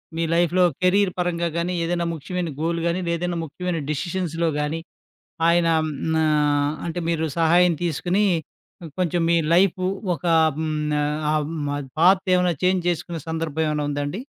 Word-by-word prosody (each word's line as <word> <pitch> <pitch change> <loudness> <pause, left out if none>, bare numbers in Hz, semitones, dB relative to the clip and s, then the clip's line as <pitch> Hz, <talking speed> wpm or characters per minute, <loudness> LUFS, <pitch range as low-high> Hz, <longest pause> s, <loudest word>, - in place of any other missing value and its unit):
మీ 165 - -1
లైఫ్‌లో 175 +1 +3 0.2
కెరీర్ 185 +1 +3
పరంగా 170 -1 0
గాని, 175 +2 -1
ఏదైనా 170 0 -1
ముఖ్యమైన 170 +2 -4
గోల్ 170 +1 0
గాని, 170 +2 0
లేదైనా 170 +1 -1
ముఖ్యమైన 175 +2 -3
డెసిషన్స్‌లో 165 +1 -2
గాని, 150 +2 -2 0.7
ఆయనా 170 -1 +3 0.5
ఆహ్, 150 -1 +2
అంటే, 170 +1 -3
మీరు 165 -1 0
సహాయం 175 +2 +4
తీసుకొని 175 +5 0 0.8
కొంచెం 175 -1 +1
మీ 170 - +4 0.2
లైఫు 185 0 +3 0.3
ఒక 175 - -7 0.3
హ్మ్. 155 -1 -2 0.6
ఆహ్, 150 -1 0 0.5
పాత్ 185 +3 +5
ఏమైనా 180 -1 +2
చేంజ్ 185 -1 +2
చేసుకునే 170 0 -3
సందర్భం 160 -1 -2
ఏమైనా 150 -1 -1
ఉందా 145 0 -2
అండి? 160 +9 -4
170 Hz, 140 wpm, -23 LUFS, 160-180 Hz, 0.8 s, పాత్